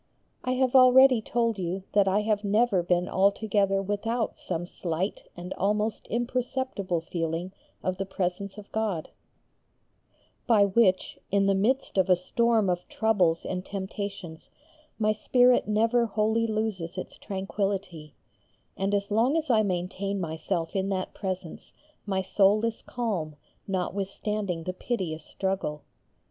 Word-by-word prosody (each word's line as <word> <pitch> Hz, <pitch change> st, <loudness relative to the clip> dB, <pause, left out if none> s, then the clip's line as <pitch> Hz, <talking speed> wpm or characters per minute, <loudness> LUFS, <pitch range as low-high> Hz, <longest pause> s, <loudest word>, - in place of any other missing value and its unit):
I 255 Hz, -, 0 dB
have 255 Hz, 0 st, +1 dB
already 255 Hz, -1 st, +7 dB
told 230 Hz, -1 st, 0 dB
you 185 Hz, +1 st, -3 dB
that 200 Hz, -1 st, +4 dB
I 195 Hz, +2 st, +3 dB
have 210 Hz, -1 st, 0 dB
never 205 Hz, -1 st, +3 dB
been 175 Hz, +1 st, +1 dB
altogether 195 Hz, 0 st, +2 dB
without 225 Hz, +4 st, -1 dB
some 175 Hz, -1 st, -4 dB
slight 175 Hz, +2 st, -3 dB
and 180 Hz, +2 st, -6 dB
almost 210 Hz, +2 st, -1 dB
imperceptible 240 Hz, -6 st, -2 dB
feeling 165 Hz, +2 st, -3 dB, 0.3 s
of 185 Hz, 0 st, -1 dB
the 195 Hz, -, -2 dB
presence 190 Hz, +1 st, -3 dB
of 205 Hz, -1 st, -11 dB
God, 210 Hz, -7 st, -2 dB, 1.4 s
by 215 Hz, -4 st, +5 dB
which 195 Hz, -2 st, +2 dB
in 200 Hz, 0 st, +2 dB
the 195 Hz, -, +3 dB
midst 215 Hz, +2 st, +1 dB
of 190 Hz, 0 st, +2 dB
a 180 Hz, -, +7 dB
storm 225 Hz, +4 st, +1 dB
of 180 Hz, -1 st, -1 dB
troubles 185 Hz, -7 st, +1 dB
and 180 Hz, -1 st, -3 dB
temptations 195 Hz, -3 st, -6 dB, 0.5 s
my 215 Hz, -1 st, +2 dB
spirit 245 Hz, +3 st, +3 dB
never 230 Hz, +3 st, +2 dB
wholly 220 Hz, +2 st, +1 dB
loses 210 Hz, -5 st, -2 dB
its 185 Hz, -, -6 dB
tranquility, 195 Hz, -5 st, -4 dB, 0.6 s
and 195 Hz, +1 st, 0 dB
as 200 Hz, +1 st, -2 dB
long 240 Hz, +8 st, +3 dB
as 315 Hz, -4 st, 0 dB
I 220 Hz, -2 st, +5 dB
maintain 195 Hz, +1 st, -2 dB
myself 165 Hz, +1 st, -3 dB
in 195 Hz, 0 st, 0 dB
that 185 Hz, -1 st, -2 dB
presence 185 Hz, -4 st, -6 dB, 0.3 s
my 190 Hz, -1 st, 0 dB
soul 205 Hz, +3 st, +3 dB
is 230 Hz, -1 st, -3 dB
calm 195 Hz, -11 st, -3 dB, 0.3 s
notwithstanding 195 Hz, -1 st, -2 dB
the 185 Hz, -, -3 dB
piteous 180 Hz, -7 st, -3 dB
struggle. 190 Hz, -6 st, -3 dB
200 Hz, 135 wpm, -27 LUFS, 185-220 Hz, 1.4 s, already